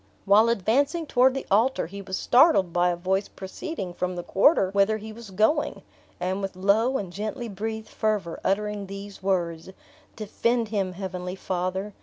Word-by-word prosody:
While 210 +3 +5
advancing 275 - +1
toward 260 -1 +3
the 270 - -4
altar, 230 +7 +3
he 200 +4 -8
was 190 -1 -4
startled 245 - +4
by 175 0 +3
a 175 - 0
voice 190 +3 -1
proceeding 190 - -6
from 180 +1 -3
the 175 - -5
quarter 195 - +3
whither 200 +2 +2
he 220 +1 -9
was 230 -1 -11
going, 220 +11 +1 0.4
and 185 +2 -2
with 195 -1 -4
low 215 +8 +2
and 185 -6 -6
gently 215 +4 -4
breathed 220 +1 -5
fervor, 210 -6 -2
uttering 205 0 -1
these 200 +1 -9
words: 175 -3 -1 0.5
"Defend 230 +2 -1
him, 195 -4 -1
Heavenly 180 -1 -5
Father! 190 +2 -3
200 Hz, 165 wpm, -25 LUFS, 185-220 Hz, 0.5 s, While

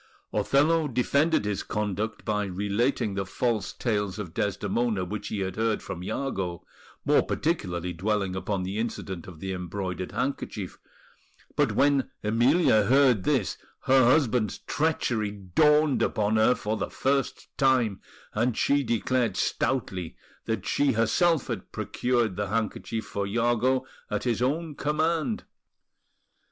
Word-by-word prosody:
Othello 155 +3 +3
defended 140 +2 +2
his 105 -1 -1
conduct 105 +1 -3
by 105 -1 0
relating 100 +4 0
the 95 0 -1
false 110 +3 -1
tales 105 -4 -1
of 95 -6 -6
Desdemona 105 0 0
which 105 +2 -5
he 105 -1 -3
had 95 0 -3
heard 110 -1 0
from 90 - -6
Iago, 95 -7 -3 0.4
more - - +5
particularly 90 - -2
dwelling 100 +1 -1
upon 95 0 -2
the 95 +3 -3
incident 95 -6 -4
of 85 -4 -11
the 95 +2 -4
embroidered 90 0 -4
handkerchief; 110 -4 -3 0.8
but - - +2
when 140 -1 +3
Emilia 115 - +4
heard 125 -4 +4
this, - - +1 0.2
her 130 0 +5
husband's 125 -5 +2
treachery 120 -9 0
dawned 145 - +3
upon 105 0 +1
her 110 +3 +5
for 110 +1 -2
the - - -3
first 135 +1 -1
time, 130 -7 +2 0.3
and 115 +2 0
she 145 0 +3
declared 120 0 0
stoutly 95 -10 -1 0.3
that - - -2
she 145 - +2
herself 130 +8 +2
had 110 -6 -5
procured 120 -5 0
the 105 0 -1
handkerchief 110 +1 -2
for 100 -2 -3
Iago 120 +4 +1 0.2
at - - -2
his 120 -2 0
own 155 +5 0
command. 160 +8 0
110 Hz, 135 wpm, -27 LUFS, 100-130 Hz, 0.8 s, more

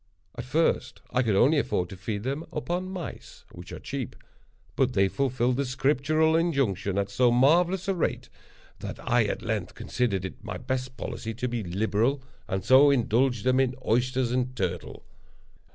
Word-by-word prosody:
At 120 - -6
first 160 +6 0
I 125 - +2
could 110 -5 +1
only 140 +9 +5
afford 90 -9 -1
to - - -8
feed 100 +2 -4
them 140 +5 -2
upon 175 +4 -3
mice 185 -3 -8
(which - - -11
are - - -6
cheap), - - -5 0.6
but 130 -2 +2
they 95 -3 +3
fulfilled 125 +1 0
the 140 - +1
scriptural 150 +5 +2
injunction 135 - 0
at 100 0 -1
so 125 +4 +3
marvellous 170 +9 +3
a 195 - +2
rate, 175 - -2 0.5
that - - -6
I - - +3
at - - -3
length - - -3
considered 100 -7 -1
it 115 +5 -8
my 100 -4 -5
best 130 +2 -4
policy 115 -1 -5
to 125 +3 -2
be 120 -1 -2
liberal, 110 +8 0 0.2
and 95 0 -3
so 130 +4 +7
indulged 120 -2 +2
them 130 +1 +3
in 130 -1 +1
oysters 125 +2 +1
and 125 0 -1
turtle. 90 -4 -4
125 Hz, 170 wpm, -27 LUFS, 110-140 Hz, 0.6 s, so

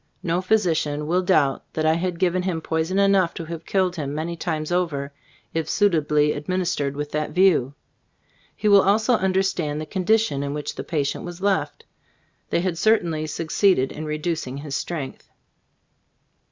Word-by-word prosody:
No 175 +1 0
physician 165 -7 +1
will 175 +4 +1
doubt 150 -7 +2
that 155 - -1
I 155 - +4
had 175 +1 -2
given 185 +1 +1
him 180 -3 -2
poison 160 +3 -1
enough 195 -3 +3
to 165 - -5
have 165 0 -7
killed 185 -2 +1
him 145 -2 -3
many 165 +2 -3
times 160 -1 -3
over, 150 -6 -1 0.4
if 165 -1 -2
suitably 150 -7 +2
administered 150 -3 -2
with 145 0 -4
that 150 0 -2
view. 170 -8 +3 0.8
He 215 - -2
will 200 -1 +7
also 215 +5 +3
understand 190 -7 0
the 155 - -4
condition 190 -3 +1
in 140 +1 -3
which 150 - -4
the - - -6
patient 145 -4 -2
was 175 0 -7
left. 195 0 -1 0.6
They - - +1
had 175 -2 -2
certainly 170 -8 +2
succeeded 165 -1 +1
in 155 - -6
reducing 155 -3 -3
his 140 -1 -5
strength. 150 -5 -5
165 Hz, 160 wpm, -23 LUFS, 150-185 Hz, 0.8 s, will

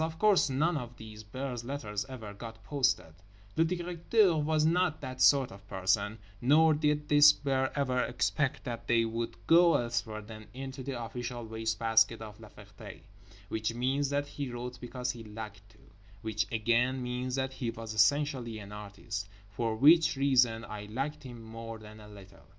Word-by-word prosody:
Of 160 0 -2
course 205 -5 +4
none 155 +5 +1
of 120 -2 -7
this 110 -1 -10
bear's 125 +3 -5
letters 120 -4 -4
ever 110 -6 -8
got 110 +1 -10
posted—Le 100 - -1
Directeur 175 +3 +2
was 155 0 +1
not 170 0 +2
that 130 -2 -6
sort 135 -1 +5
of 100 0 -14
person; 100 +3 0 0.2
nor 155 +5 +5
did 150 0 0
this 150 0 +8
bear 135 -2 -1
ever 130 -3 +1
expect 135 +3 -1
that 120 -3 -6
they 115 -1 +3
would 115 +1 -3
go 170 0 +6
elsewhere 110 -2 -2
than 110 0 -11
into 135 0 -6
the 130 -1 -4
official 120 +1 -5
waste 110 0 -2
basket 115 0 +3
of 105 -1 -10
La - - -12
Ferté, - - -12 0.5
which 110 +1 -2
means 135 +3 0
that 145 0 0
he 145 -1 -5
wrote 120 0 -6
because 125 0 -3
he 120 -3 -9
liked 105 -2 -9
to; 110 - -22 0.5
which 110 0 -2
again 120 +3 +1
means 125 +1 -3
that 135 0 -2
he 125 -3 -3
was 115 -1 -6
essentially 120 +1 +2
an 100 -1 -9
artist—for 100 +1 -5
which 155 +5 +6
reason 125 -4 +3
I 105 -1 -7
liked 140 +7 -3
him 120 -4 -10
more 115 0 -8
than 110 0 -12
a 105 - -12
little. 100 -2 -15
120 Hz, 170 wpm, -31 LUFS, 110-140 Hz, 0.5 s, this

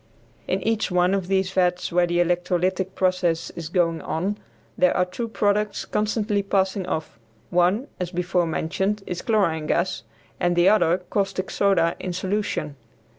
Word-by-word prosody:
In 185 - -1
each 225 -1 0
one 180 0 +2
of 195 -3 -1
these 190 -1 +1
vats 180 -1 +1
where 175 0 +3
the 175 0 0
electrolytic 180 +2 0
process 180 -3 0
is 165 -2 -7
going 165 -2 +1
on 195 +6 -2 0.4
there 180 - +3
are 180 - +3
two 230 +6 -5
products 210 -1 0
constantly 210 -1 0
passing 195 -1 0
off; 155 -7 -4 0.3
one, 180 +8 +2
as 180 -2 -2
before 175 -1 0
mentioned, 190 +6 -1
is 180 - -4
chlorine 170 -9 +1
gas, 170 -3 0 0.4
and 175 0 +1
the 175 +1 +4
other 180 -5 +4
caustic 195 -2 -1
soda 180 -4 +2
in 185 - -4
solution. 185 -6 -2
185 Hz, 155 wpm, -24 LUFS, 175-195 Hz, 0.4 s, the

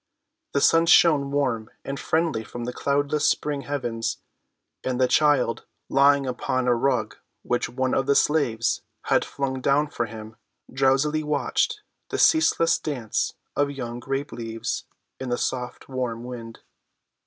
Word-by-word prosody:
The 140 - +2
sun 165 +3 +5
shone 150 -5 +5
warm 130 -6 -1 0.2
and 140 0 -4
friendly 160 -8 0
from 120 +2 -7
the 125 +1 -4
cloudless 145 +2 +1
spring 145 -2 -1
heavens, 120 -6 -3 0.7
and 130 -1 -2
the 130 - +4
child, 140 -6 +2 0.2
lying 140 0 +4
upon 130 0 -1
a 125 - +5
rug 135 +3 0 0.3
which 120 - -1
one 130 +1 -1
of 135 - +1
the 140 - +4
slaves 120 -8 +2 0.2
had - - +2
flung 130 -2 -3
down 145 +3 +2
for 120 - -2
him, 110 0 -10 0.4
drowsily 135 +3 +2
watched 150 - 0 0.3
the - - -2
ceaseless 315 - +4
dance 120 -8 -2 0.2
of 145 0 +2
young 120 -4 -5
grape 135 +3 -3
leaves 115 -1 -4 0.3
in 130 - -4
the 120 - 0
soft 125 -1 -3
warm 125 -3 -3
wind. 115 -2 -8
135 Hz, 145 wpm, -25 LUFS, 120-145 Hz, 0.7 s, sun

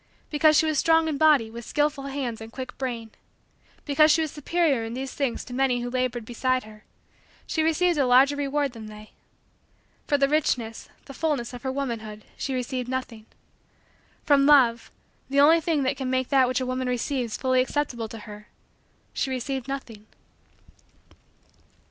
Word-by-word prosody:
Because 305 0 +4
she - - +4
was 310 -3 +1
strong 325 0 +3
in 295 -3 -2
body 290 -8 +4
with 235 +1 -8
skillful 295 +1 -1
hands 270 -5 -4
and 225 0 -9
quick 255 0 -7
brain; 235 -4 -4 0.7
because 305 +1 +4
she 320 +1 +4
was 310 - -4
superior 295 -4 0
in 225 +1 -5
these 265 0 -5
things 270 -5 -2
to 245 - -9
many 255 -1 +1
who 245 0 -4
labored 250 -2 -2
beside 255 +2 -1
her; 215 0 -14 0.6
she 320 - -1
received 325 +1 +2
a 270 - +3
larger 265 +3 +5
reward 285 0 -1
than 220 -2 -9
they. 215 0 -12 1.0
For 290 - +2
the 275 0 +3
richness, 250 -7 -1 0.2
the 275 - -10
fullness, 280 -5 -2
of 245 - -8
her 265 - -2
womanhood, 225 -6 -5
she 270 - -3
received 250 0 -3
nothing. 245 -4 -5 1.0
From 280 -1 +4
love, 240 -6 +4 0.4
the 275 +1 +1
only 320 +4 +6
thing 310 -3 0
that 260 - -1
can 260 -1 -3
make 260 0 0
that 265 -3 +4
which 255 +1 0
a 255 - -2
woman 255 0 -2
receives 250 -1 -2
fully 255 -1 +2
acceptable 255 -4 -2
to 225 - -9
her, 210 0 -11 0.7
she 270 - -1
received 260 0 -3
nothing. 230 -6 -7
260 Hz, 175 wpm, -25 LUFS, 240-285 Hz, 1.0 s, only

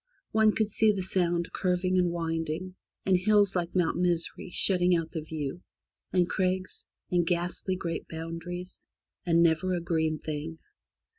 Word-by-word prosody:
One 220 0 +5
could 220 - +2
see 215 +1 +3
the 195 -2 -2
Sound 175 -2 0
curving 185 0 +1
and 180 -1 +3
winding, 165 +1 -3 0.3
and 190 - +4
hills 205 +1 +3
like 175 -1 -2
Mount 170 -3 +2
Misery 175 0 -1
shutting 180 -1 +3
out 165 -1 -4
the 160 - -3
view, 155 0 -5 0.5
and 180 -2 +3
crags, 185 0 -1 0.3
and 175 -1 +3
ghastly 175 +2 -1
great 170 -3 -4
boulders, 165 +2 -6 0.5
and 170 0 +5
never 170 +3 +2
a - - -1
green 160 -2 0
thing. 155 +1 -5
175 Hz, 150 wpm, -29 LUFS, 165-185 Hz, 0.5 s, One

